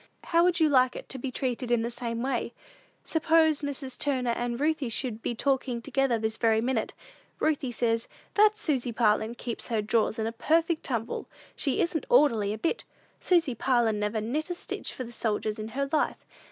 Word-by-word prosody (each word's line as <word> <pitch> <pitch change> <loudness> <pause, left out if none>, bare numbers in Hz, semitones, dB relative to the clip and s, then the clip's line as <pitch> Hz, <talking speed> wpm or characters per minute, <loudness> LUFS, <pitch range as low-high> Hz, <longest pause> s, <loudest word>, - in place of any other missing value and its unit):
How 335 0 +3
would 360 +1 +3
you 320 - +5
like 255 -3 +4
it - - -8
to 265 - -6
be 265 - -3
treated 250 -1 -2
in 240 -2 +2
the 235 - -2
same 235 -1 -3
way? 245 -3 -2 0.5
Suppose 320 -1 +3
Mrs. 275 -2 -5
Turner 255 -4 +1
and 240 0 -2
Ruthie 295 -3 0
should 230 -1 -2
be 240 - -2
talking 265 -1 0
together 265 +1 +1
this 220 0 -2
very 225 -2 +3
minute. 235 -1 -1 0.5
Ruthie 285 -5 0
says, 230 -1 0 0.3
'That 425 +1 +5
Susy 265 - -1
Parlin 220 0 +2
keeps 235 -1 -5
her 230 -3 0
drawers 215 +1 +1
in 220 - -1
a 225 - -1
perfect 320 +7 +1
tumble; 235 -3 -3 0.3
she 275 -3 0
isn't 340 +7 -1
orderly 230 - +4
a 215 - -3
bit. 335 - -1 0.4
Susy 335 -7 +2
Parlin 235 -3 +1
never 210 +1 -1
knit 290 +10 -2
a 355 - -2
stitch - - -5
for 255 - -6
the 235 - -9
soldiers 215 -2 -1
in 215 - -4
her 275 +5 -2
life. 310 - 0
250 Hz, 195 wpm, -28 LUFS, 230-295 Hz, 0.5 s, you